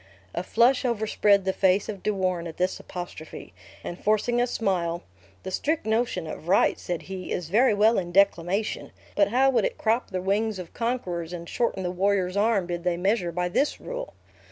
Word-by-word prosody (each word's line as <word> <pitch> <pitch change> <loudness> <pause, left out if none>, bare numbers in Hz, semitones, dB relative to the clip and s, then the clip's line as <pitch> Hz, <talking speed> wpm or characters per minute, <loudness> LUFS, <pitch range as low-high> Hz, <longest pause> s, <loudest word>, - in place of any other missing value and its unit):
A 175 - -1
flush 235 +7 +3
overspread 210 -4 +2
the 190 - +1
face 190 +1 +2
of 200 -3 -6
De - - -1
Warenne 185 -3 -1
at 160 - -9
this 185 +1 0
apostrophe; 165 - -8 0.3
and 175 - -7
forcing 240 +3 +2
a 245 - +2
smile, 175 -7 -1 0.4
"The 190 - -5
strict 305 - -1
notion 220 -5 0
of 155 - -8
right," 190 - +3
said 175 -2 -4
he, 190 -1 -7
"is 170 -3 -3
very 225 +3 +4
well 215 +2 +4
in 175 -2 -5
declamation, 195 +2 +1 0.2
but 200 -1 +4
how 260 +5 +3
would 255 - +2
it - - -1
crop 230 +3 0
the 185 - -2
wings 205 +3 0
of 180 -2 -8
conquerors, 180 -9 -2
and 170 -1 -6
shorten 230 -3 -1
the 180 - -1
warrior's 185 0 +1
arm, 205 -2 +2
did 175 -1 -4
they 180 -1 0
measure 185 -1 +1
by 180 +1 -1
this 275 +11 0
rule!" - - -6
195 Hz, 195 wpm, -26 LUFS, 180-225 Hz, 0.4 s, very